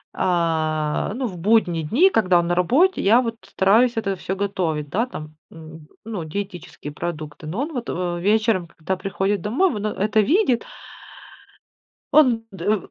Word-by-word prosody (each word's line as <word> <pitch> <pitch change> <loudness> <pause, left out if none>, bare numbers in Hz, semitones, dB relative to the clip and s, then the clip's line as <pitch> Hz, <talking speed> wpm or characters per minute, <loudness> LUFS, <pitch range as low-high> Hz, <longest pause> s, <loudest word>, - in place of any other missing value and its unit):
а, 160 -3 0
ну, 260 0 -2
в 180 -4 -8
будние 180 -5 +2
дни, 290 - +4
когда 185 -5 +3
он 170 - 0
на 175 - +1
работе, 280 - +3
я 225 +6 +5
вот 230 -2 -3
стараюсь 225 +6 +3
это 195 -3 -1
всё 190 +1 -4
готовить, 170 -7 -2
да, 230 +9 0
там, 155 -9 -9 0.2
м, 160 -1 -12 0.2
ну, 210 -7 -4
диетические 175 -3 -6
продукты. 155 -2 -6
Но 195 - -3
он 310 +2 -4
вот, 240 -2 -4
э, 175 -1 -2
вечером, 210 -2 +1
когда 170 +3 -4
приходит 195 +1 -2
домой, 280 - +1
вот 210 -3 -4
он 210 - -1
это 215 +2 +1
видит 265 - +3 1.5
он 250 -7 +5
дэ 190 - -8
в - - -15
195 Hz, 165 wpm, -22 LUFS, 170-225 Hz, 1.5 s, я